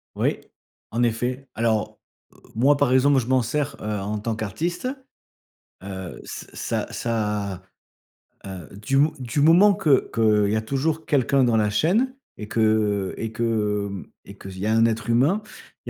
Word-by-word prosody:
Oui. -, -, 0 dB, 0.5 s
En 115 Hz, -, -1 dB
effet. 120 Hz, +3 st, -1 dB
Alors, 110 Hz, -2 st, 0 dB, 0.3 s
heu, -, -, -22 dB, 0.2 s
moi, 135 Hz, +5 st, +4 dB
par 140 Hz, -3 st, +2 dB
exemple, 135 Hz, +1 st, +4 dB
je 120 Hz, -, -4 dB
m'en 130 Hz, 0 st, +3 dB
sers, 145 Hz, +5 st, -2 dB
heu, -, -, -7 dB
en 105 Hz, +2 st, -3 dB
tant 110 Hz, +2 st, -2 dB
qu'artiste, 160 Hz, -, -3 dB, 1.0 s
heu, 95 Hz, -2 st, -7 dB
s -, -, -8 dB
ça -, -, -3 dB
ça, 105 Hz, -5 st, -2 dB, 0.8 s
heu, 95 Hz, -5 st, -8 dB
du 110 Hz, +7 st, -1 dB
mo 150 Hz, +3 st, +4 dB
du 125 Hz, +1 st, -3 dB
moment 175 Hz, +7 st, +6 dB
que 150 Hz, -7 st, +2 dB
qu'il 105 Hz, -3 st, +3 dB
y -, -, +1 dB
a -, -, 0 dB
toujours 145 Hz, +7 st, -2 dB
quelqu'un 140 Hz, -2 st, +2 dB
dans 120 Hz, -2 st, +2 dB
la 105 Hz, -1 st, +2 dB
chaîne 205 Hz, -, +1 dB, 0.2 s
et 105 Hz, -, -7 dB
que 110 Hz, -3 st, +1 dB
et 115 Hz, -, -4 dB
que, 105 Hz, -3 st, 0 dB
hem 100 Hz, -1 st, -7 dB, 0.2 s
et 100 Hz, -, -12 dB
qu'il 95 Hz, -1 st, -9 dB
y 100 Hz, -, -3 dB
a 110 Hz, -, +2 dB
un 115 Hz, 0 st, +4 dB
être 115 Hz, -1 st, -1 dB
humain, 140 Hz, -, +3 dB, 0.4 s
il -, -, -6 dB
115 Hz, 175 wpm, -23 LUFS, 105-135 Hz, 1.0 s, moment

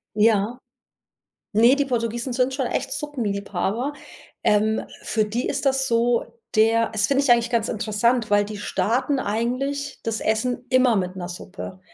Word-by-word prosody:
Ja. 215 Hz, +2 st, +2 dB, 0.9 s
Ne, 235 Hz, +5 st, +6 dB
die 285 Hz, -1 st, +1 dB
Portugiesen 240 Hz, 0 st, -2 dB
sind 255 Hz, +1 st, +1 dB
schon 265 Hz, -3 st, -1 dB
echt 270 Hz, +2 st, -2 dB
Suppenliebhaber. 225 Hz, -1 st, -2 dB, 0.5 s
Ähm, 215 Hz, +1 st, +2 dB, 0.2 s
für 215 Hz, -1 st, 0 dB
die 230 Hz, +5 st, -2 dB
ist 280 Hz, +1 st, -2 dB
das 265 Hz, 0 st, +2 dB
so, 235 Hz, 0 st, +2 dB, 0.3 s
der 225 Hz, +1 st, +3 dB
das 210 Hz, -1 st, +1 dB
finde 275 Hz, 0 st, +2 dB
ich 265 Hz, -, +1 dB
eigentlich 235 Hz, 0 st, +2 dB
ganz 230 Hz, -2 st, +1 dB
interessant, 220 Hz, +2 st, 0 dB
weil 205 Hz, 0 st, +4 dB
die 210 Hz, 0 st, -7 dB
starten 255 Hz, +6 st, 0 dB
eigentlich 260 Hz, +6 st, -2 dB
das 225 Hz, -1 st, -2 dB
Essen 245 Hz, +3 st, -1 dB
immer 255 Hz, -3 st, +4 dB
mit 185 Hz, 0 st, -2 dB
'ner 175 Hz, -1 st, -5 dB
Suppe. 185 Hz, +1 st, -8 dB
230 Hz, 155 wpm, -23 LUFS, 210-255 Hz, 0.9 s, Ne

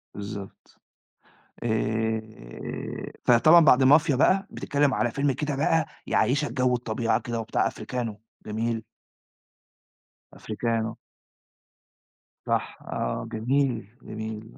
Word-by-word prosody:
بالضبط، 100 Hz, -1 st, -9 dB, 0.8 s
آآ، 110 Hz, -, -3 dB
فطبعًا 155 Hz, +8 st, +7 dB
بعد 135 Hz, -2 st, +6 dB
مافيا 145 Hz, +2 st, +5 dB
بقى 190 Hz, +8 st, +3 dB
بتتكلم 145 Hz, -1 st, +1 dB
على 120 Hz, -, +1 dB
فيلم 140 Hz, +2 st, +1 dB
كده 145 Hz, +2 st, -2 dB
بقى 160 Hz, +1 st, +2 dB, 0.2 s
يعيّشك 140 Hz, +7 st, +1 dB
جو 125 Hz, -1 st, +2 dB
الطبيعة 115 Hz, -1 st, 0 dB
كده 120 Hz, -1 st, -3 dB
وبتاع 115 Hz, -, 0 dB
أفريكانو، 115 Hz, -4 st, -5 dB, 0.2 s
جميل. 115 Hz, +1 st, -2 dB, 1.5 s
أفريكانو. 110 Hz, 0 st, -2 dB, 1.5 s
صح -, -, -1 dB
آه، -, -, -3 dB
جميل، 125 Hz, -1 st, 0 dB, 0.2 s
جميل، 110 Hz, 0 st, -7 dB
120 Hz, 95 wpm, -26 LUFS, 110-140 Hz, 1.5 s, فطبعًا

